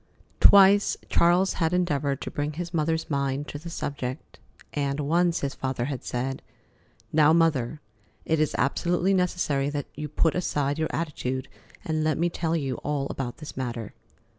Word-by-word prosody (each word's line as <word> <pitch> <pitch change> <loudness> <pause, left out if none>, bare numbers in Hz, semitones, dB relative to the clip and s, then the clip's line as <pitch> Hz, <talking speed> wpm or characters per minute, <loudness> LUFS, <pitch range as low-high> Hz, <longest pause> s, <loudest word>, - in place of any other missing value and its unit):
Twice 200 +1 +6
Charles 175 +3 +3
had 165 +1 +2
endeavored 145 -6 0
to - - -5
bring 145 +1 -2
his 175 +2 -5
mother's 160 0 0
mind 140 0 -1
to 145 - -6
the 170 +3 -8
subject, 140 -4 -5 0.3
and 140 -1 -1
once 170 +4 +2
his 140 -1 -2
father 130 -2 -2
had 135 -2 -4
said: 130 +2 -3 0.7
"Now, 155 0 +5
Mother, 155 -4 +2 0.4
it 160 -1 +1
is 155 -2 +1
absolutely 175 +7 +1
necessary 175 -7 +1
that 145 -1 -3
you 150 - -5
put 160 +2 +2
aside 145 -4 -1
your 160 - 0
attitude 130 -5 -3 0.4
and 155 -1 0
let 155 0 +1
me 170 +1 +1
tell 165 -1 -1
you 135 -6 -2
all 145 -2 -2
about 125 -3 -4
this 155 - -9
matter." 120 -4 -4
150 Hz, 165 wpm, -26 LUFS, 140-165 Hz, 0.7 s, Twice